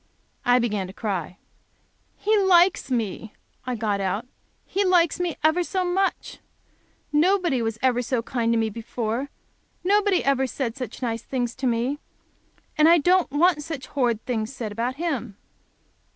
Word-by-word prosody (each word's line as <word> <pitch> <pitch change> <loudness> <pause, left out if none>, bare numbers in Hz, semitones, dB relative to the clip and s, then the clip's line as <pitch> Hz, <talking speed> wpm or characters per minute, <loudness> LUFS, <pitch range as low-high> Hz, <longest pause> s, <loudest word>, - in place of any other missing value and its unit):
I 245 0 +4
began 210 -6 -1
to 185 - -10
cry. 190 -4 -4 0.8
"He 435 +1 +2
likes 375 -5 +4
me," 220 -3 -2 0.3
I 250 - -1
got 210 -3 -1
out, 195 +4 -1 0.4
"he 400 - 0
likes 355 -4 +3
me 350 -3 -1
ever 315 +3 +3
so 370 +1 -1
much. 380 +2 -1 0.7
Nobody 345 -3 +3 0.2
ever 260 -1 +4
was 245 0 -2
so 245 -3 0
kind 235 -2 -1
to 230 - +2
me 225 -1 0
before. 230 +4 -3 0.5
Nobody 400 0 +3
ever 270 -1 +2
said 240 -1 -3
such 250 -1 -7
nice 230 -2 -2
things 245 -2 -3
to 260 0 -2
me. 245 +5 0 0.8
And 310 +2 +7
I 340 - +7
don't 360 +4 +3
want 305 +2 +3
such 285 -3 -6
horrid 240 -5 -1
things 225 -2 -2
said 230 -5 -5
about 235 +4 -2
him." 275 - -3
260 Hz, 155 wpm, -24 LUFS, 230-340 Hz, 0.8 s, And